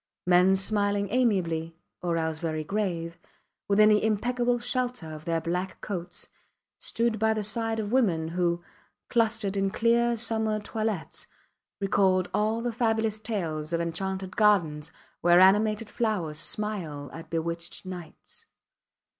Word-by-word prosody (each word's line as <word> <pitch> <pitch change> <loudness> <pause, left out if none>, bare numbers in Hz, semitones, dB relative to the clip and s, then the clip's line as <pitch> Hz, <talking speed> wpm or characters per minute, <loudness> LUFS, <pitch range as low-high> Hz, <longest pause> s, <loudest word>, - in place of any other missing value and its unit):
Men 180 +1 +5
smiling 200 0 0
amiably, 175 -10 +1 0.3
or 170 -1 0
else 160 -1 -2
very 160 -2 -2
grave, 170 -3 -2 0.5
within 210 +1 +5
the 210 -1 +4
impeccable 240 +3 +1
shelter 245 -8 -2
of 155 0 -9
their 165 -1 0
black 180 +3 -3
coats, 180 -3 -6 0.5
stood 230 -2 -1
by 220 0 +2
the 215 - -2
side 225 +2 -1
of 210 -1 -3
women 180 -11 +2
who, 175 0 0 0.5
clustered 225 -4 +1
in 195 0 +1
clear 235 +3 +2
summer 220 -1 0
toilettes, 215 -4 -3 0.5
recalled 190 -2 +2
all 220 +2 +1
the 240 0 -2
fabulous 225 -2 0
tales 170 -8 -3
of 170 - +1
enchanted 190 +3 -3
gardens 170 -9 +3 0.3
where 175 +1 +5
animated 210 +3 +4
flowers 190 -10 -1
smile 165 -10 -3
at 165 - -9
bewitched 170 +2 -4
knights. 180 -4 -9
200 Hz, 130 wpm, -27 LUFS, 170-220 Hz, 0.5 s, Men